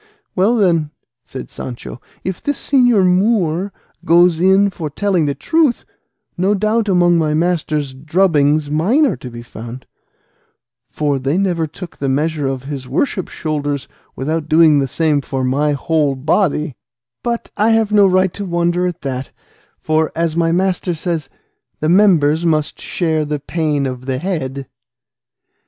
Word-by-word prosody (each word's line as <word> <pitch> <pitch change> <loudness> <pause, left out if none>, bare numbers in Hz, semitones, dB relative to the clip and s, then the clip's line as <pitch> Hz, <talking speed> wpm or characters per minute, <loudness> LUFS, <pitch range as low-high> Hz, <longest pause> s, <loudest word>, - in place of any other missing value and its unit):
"Well 200 +6 +3
then," 170 -8 +2 0.3
said 130 - -9
Sancho, 125 0 -8 0.2
"if 185 -1 -4
this 290 0 -4
señor 245 -8 +4
Moor 185 -1 +1 0.3
goes 170 0 +4
in 190 +2 +4
for 160 -4 -5
telling 185 +1 0
the 140 -1 -1
truth, 320 -7 +1 0.5
no 190 +4 +1
doubt 215 +2 0
among 175 -2 +4
my 155 -1 +1
master's 155 -4 -1
drubbings 150 -1 +1
mine 205 - +3
are 275 - 0
to 125 - -8
be 120 0 -9
found; 120 +2 -9 1.0
for 145 -2 -1
they 135 +6 0
never 175 -5 0
took 170 +3 -10
the 140 - -2
measure 150 +1 0
of 135 -1 -3
his 135 -2 -6
worship's 185 - -1
shoulders 145 -3 -3 0.3
without 155 +3 -3
doing 155 -2 +5
the 135 - 0
same 145 +1 +1
for 135 -1 -3
my 145 +4 +1
whole 145 0 0
body; 150 0 0 0.5
but 235 -1 -3
I 215 +2 +2
have 225 -2 +2
no 205 -2 +5
right 185 -1 +2
to 205 - -5
wonder 175 0 0
at 175 - -5
that, 130 -1 -4 0.5
for, 155 0 0
as 165 -1 0
my 165 -1 +2
master 185 0 0
himself 170 +1 -2
says, 135 - -21 0.5
the 155 - 0
members 170 -5 +4
must 155 -3 0
share 160 -3 -1
the 150 0 -3
pain 150 -1 -1
of 130 0 -5
the 130 -1 -1
head." 140 -5 -3
160 Hz, 155 wpm, -17 LUFS, 145-185 Hz, 1.0 s, doing